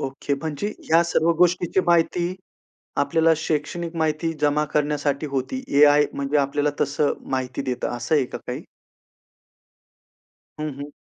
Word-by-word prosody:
Okay. 135 +1 -2
म्हणजे 155 +6 -3
ह्या 165 +1 +3
सर्व 170 0 +2
गोष्टीची 175 +1 +3
माहिती 175 +1 +2 0.6
आपल्याला 165 +3 +3
शैक्षणिक 160 +2 -3
माहिती 160 +1 0
जमा 150 0 +2
करण्यासाठी 145 0 0
होती. 140 - -3
एआय 145 0 +5
म्हणजे 140 +1 -1
आपल्याला 145 +1 +1
तसं 145 +1 +1 0.2
माहिती 130 -1 -2
देतं 130 -2 -2
असं 120 +6 -1
आहे 145 -3 +3
का - - -7
काही? - - -4 2.0
हं, 155 0 -2
हं. 145 +1 -6
150 Hz, 130 wpm, -23 LUFS, 140-165 Hz, 2.0 s, एआय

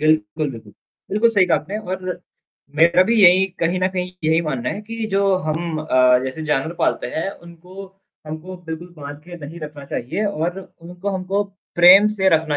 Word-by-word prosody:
बिल्कुल, 155 -2 +1
बिल्कुल। 110 -4 -11 0.4
बिल्कुल 215 +4 +3
सही 200 -4 +4
कहा 170 - +3
आपने 200 - -6
और 185 -1 -4 0.6
मेरा 170 +3 +5
भी 235 - +3
यही 185 +1 +7 0.2
कहीं 170 +2 +1
न 185 - +2
कहीं 180 -1 -3
यही 160 +1 +3
मानना 135 -6 -3
है 205 - -5
कि 230 0 -4
जो 195 +1 +2 0.3
हम 160 +1 -2
अ, 130 -4 +4
जैसे 130 +4 -5
जानवर 150 +1 0
पालते - - +1
हैं, 160 +5 -2
उनको 180 +2 -12 0.4
हमको 160 +4 -7
बिल्कुल 165 +2 -6
बाँध 145 -1 -8
के 175 0 -10
नहीं 165 +4 -10
रखना 150 -2 -8
चाहिए 165 - -2
और 175 -2 -2 0.2
उनको 180 +3 -6
हमको 190 +2 -1 0.3
प्रेम 185 +4 +8
से 200 -3 +1
रखना 160 -3 +2
170 Hz, 180 wpm, -20 LUFS, 155-185 Hz, 0.6 s, प्रेम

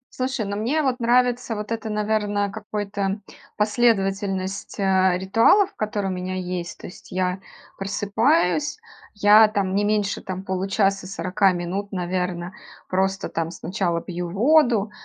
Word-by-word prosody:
Слушай, 255 -4 -2
ну, 200 0 -3
мне, 260 +9 0
вот, 260 -3 0
нравится 245 0 +2
вот 210 0 -6
это, 225 -1 -3
наверное, 210 -1 0
какой-то 205 -1 -3 0.4
последовательность, 195 -3 0
а, 190 -1 +3
ритуалов, 230 - +4
которые 210 -2 -2
у - - -2
меня 185 +1 -4
есть. 180 -2 -4
То - - -9
есть 180 - -13
я 185 0 -1 0.4
просыпаюсь, 225 - +1 0.4
я, 210 +1 +7
там, 195 -3 -1
не 205 - +2
меньше, 205 -1 0
там, 185 0 -6
получаса- 195 0 0
40 190 +1 +1
минут, 185 +3 -4
наверно, 180 -1 -3 0.3
просто, 190 +1 0
там, 165 0 -3
сначала 175 -1 -2
пью 175 0 -5
воду, 235 - +3
200 Hz, 135 wpm, -23 LUFS, 185-215 Hz, 0.4 s, я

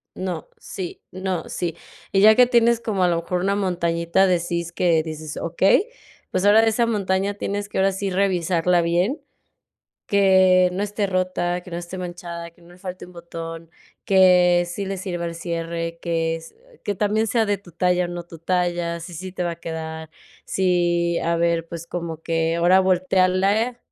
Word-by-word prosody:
no, 180 -4 -5
sí, 185 -3 -7
no, 185 -2 -3
sí". 170 -2 -3 0.4
Y 195 - +3
ya 215 +1 +8
que 250 -1 +6
tienes 235 -1 +3
como 200 -5 -1
a - - +4
lo 170 -1 +1
mejor 180 +1 -2
una 200 +1 +1
montañita 170 -1 +1
de 180 -2 +2
síes 170 0 -3
que 170 -2 +2
dices: 155 -1 -7
"Okey", 190 - +2 0.4
pues 185 - 0
ahora 210 +2 +7
de 225 - +3
esa 230 +2 +1
montaña 200 -2 0
tienes 205 0 -3
que - - -5
ahora 195 0 +3
sí 195 +1 -3
revisarla 180 -2 +2
bien, 175 - 0 0.9
que 190 -2 +5
no 190 - -2
esté 205 0 -1
rota, 185 -1 -1
que 180 - -13
no 170 - -4
esté 175 +2 -7
manchada, 175 -1 -6
que 170 +1 -25
no 170 - -18
le 180 - -17
falte 185 -1 -7
un 180 - -15
botón, 165 -1 -8 0.4
que 180 -2 +5
sí 195 +3 -4
le 195 - -3
sirva 175 -2 -4
el 170 - -5
cierre, 165 0 -4
que 165 -1 -1
es 165 0 -12 0.3
que 205 - -1
también 210 +3 +1
sea 225 +1 +2
de 205 -1 0
tu 180 -4 -17
talla 180 +1 +1
o - - -10
no 175 0 -5
tu 170 -1 -13
talla, 175 0 -1
si 175 +2 -9
sí 185 +3 -7
te 180 - -3
va 170 - -1
a 170 - -8
quedar, 160 -1 -6 0.4
si 175 -2 +1
a 170 0 0
ver, 170 0 +1
pues 170 0 -7
como 165 -2 -5
que 165 0 0
ahora 180 +3 +5
voltéarle 190 +5 +2
180 Hz, 190 wpm, -22 LUFS, 170-190 Hz, 0.9 s, ya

